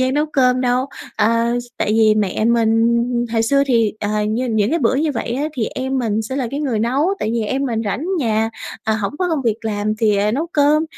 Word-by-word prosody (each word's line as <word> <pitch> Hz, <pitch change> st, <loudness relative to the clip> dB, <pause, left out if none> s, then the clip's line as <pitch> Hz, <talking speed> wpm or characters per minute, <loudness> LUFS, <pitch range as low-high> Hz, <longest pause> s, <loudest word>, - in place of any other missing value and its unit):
gian 260 Hz, +1 st, +1 dB
nấu 300 Hz, +1 st, +1 dB
cơm 255 Hz, -4 st, +2 dB
đâu. 250 Hz, +1 st, +1 dB, 0.3 s
À, 230 Hz, +2 st, +2 dB
s -, -, -13 dB
tại -, -, -1 dB
vì 220 Hz, -1 st, +4 dB
mẹ 210 Hz, 0 st, 0 dB
mình 235 Hz, 0 st, +2 dB, 0.3 s
hồi 225 Hz, -1 st, +2 dB
xưa 275 Hz, +5 st, +3 dB
thì, 230 Hz, -5 st, +2 dB
ờ, 210 Hz, 0 st, -1 dB
như 245 Hz, +4 st, -1 dB
những 220 Hz, -1 st, +1 dB
cái 335 Hz, -, +1 dB
bữa 240 Hz, 0 st, +2 dB
như 300 Hz, +2 st, 0 dB
vậy 230 Hz, -2 st, -3 dB
á, 270 Hz, +4 st, -1 dB
thì 235 Hz, -, 0 dB
em 265 Hz, +1 st, -2 dB
mình 220 Hz, -3 st, 0 dB
sẽ 260 Hz, +5 st, -5 dB
là 265 Hz, -3 st, -1 dB
cái 280 Hz, +2 st, -3 dB
người 255 Hz, -7 st, -1 dB
nấu 255 Hz, +8 st, +1 dB
tại 215 Hz, -, -2 dB
vì 235 Hz, -, 0 dB
em 260 Hz, +6 st, -1 dB
mình 230 Hz, -4 st, -1 dB
rảnh 210 Hz, +8 st, -2 dB
nhà, 225 Hz, -4 st, 0 dB, 0.3 s
à, 220 Hz, -, +1 dB
hổng 210 Hz, +5 st, -3 dB
có 365 Hz, -1 st, 0 dB
công 315 Hz, -4 st, -1 dB
việc 225 Hz, -2 st, -1 dB
làm 215 Hz, 0 st, -1 dB
thì, 215 Hz, -3 st, +2 dB
à, 205 Hz, +1 st, +1 dB
nấu 295 Hz, +8 st, -1 dB
cơm. 300 Hz, +2 st, +3 dB
235 Hz, 245 wpm, -19 LUFS, 220-265 Hz, 0.3 s, vì